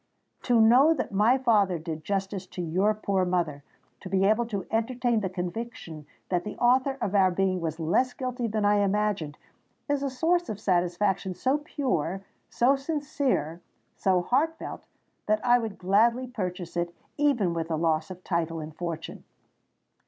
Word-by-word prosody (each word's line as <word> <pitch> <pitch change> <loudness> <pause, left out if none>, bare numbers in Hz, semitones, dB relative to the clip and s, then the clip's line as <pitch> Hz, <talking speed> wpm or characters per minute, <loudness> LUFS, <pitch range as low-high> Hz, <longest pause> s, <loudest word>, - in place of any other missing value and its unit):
To 240 -2 +4
know 255 +8 +6
that 255 - -3
my 215 +6 +4
father 210 -8 +2
did 160 -1 -6
justice 195 0 -3
to 180 - -6
your 190 +6 +1
poor 200 -3 0
mother—to 175 0 -4
be 190 0 +2
able 220 +3 +2
to 200 -5 -4
entertain 235 +1 +1
the 195 -3 -2
conviction 180 -4 -6 0.2
that 175 -1 0
the 210 - -7
author 260 +2 +3
of 195 - -2
our 190 -2 +5
being 185 0 0
was 160 0 -3
less 175 +11 +1
guilty 250 -2 -3
than 215 -1 -1
I 205 0 +4
imagined—is 205 - -2
a 280 - -1
source 335 +7 +1
of 210 - -4
satisfaction 185 +1 0
so 265 +8 +1
pure—so 245 - -1
sincere—so 260 - -2
heart 315 - +1
felt, - - -8 0.4
that 215 +2 +1
I 245 0 +5
would 220 -4 -5
gladly 225 +7 +2
purchase 180 -8 -5
it 175 0 -2 0.2
even 255 - +2
with 165 -1 -2
the 160 -1 -1
loss 155 -1 0
of 185 0 -9
title 165 -2 -1
and 155 0 -7
of 155 - -24
fortune!" 165 -2 -5
200 Hz, 160 wpm, -27 LUFS, 175-245 Hz, 0.4 s, know